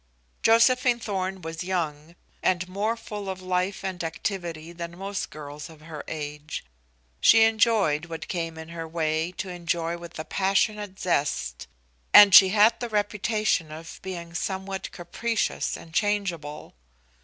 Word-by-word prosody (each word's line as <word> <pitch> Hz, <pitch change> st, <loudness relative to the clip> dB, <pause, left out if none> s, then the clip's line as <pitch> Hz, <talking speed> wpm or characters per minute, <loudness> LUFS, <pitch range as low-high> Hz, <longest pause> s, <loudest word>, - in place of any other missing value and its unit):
Josephine 240 Hz, +2 st, +4 dB
Thorn 190 Hz, -3 st, -3 dB
was 160 Hz, +1 st, -5 dB
young 165 Hz, -3 st, -3 dB, 0.3 s
and 185 Hz, 0 st, +1 dB
more 210 Hz, +5 st, -1 dB
full 210 Hz, -3 st, -6 dB
of 190 Hz, -1 st, -4 dB
life 185 Hz, +1 st, -1 dB
and 185 Hz, -2 st, -3 dB
activity 170 Hz, -1 st, -4 dB
than 170 Hz, 0 st, -7 dB
most 195 Hz, +1 st, -4 dB
girls 150 Hz, 0 st, -8 dB
of 160 Hz, -2 st, -15 dB
her 155 Hz, -1 st, -8 dB
age. 150 Hz, -, -6 dB, 0.5 s
She 225 Hz, 0 st, +7 dB
enjoyed 220 Hz, -8 st, +3 dB
what 165 Hz, -1 st, -6 dB
came 165 Hz, -2 st, -3 dB
in 160 Hz, 0 st, -8 dB
her 165 Hz, -1 st, -6 dB
way 160 Hz, +1 st, -1 dB
to 190 Hz, -, -5 dB
enjoy 170 Hz, -1 st, -2 dB
with 170 Hz, -1 st, -10 dB
a 155 Hz, -, -5 dB
passionate 200 Hz, +1 st, 0 dB
zest, 140 Hz, -, -1 dB, 0.5 s
and 205 Hz, -2 st, +10 dB
she 190 Hz, -, +10 dB
had 220 Hz, +3 st, +4 dB
the 240 Hz, -, -4 dB
reputation 210 Hz, -5 st, 0 dB
of 160 Hz, +1 st, -9 dB
being 170 Hz, -3 st, -6 dB
somewhat 190 Hz, +2 st, -3 dB
capricious 215 Hz, +6 st, -2 dB
and 165 Hz, -, -13 dB
changeable. 180 Hz, -7 st, -1 dB
180 Hz, 145 wpm, -26 LUFS, 160-205 Hz, 0.5 s, and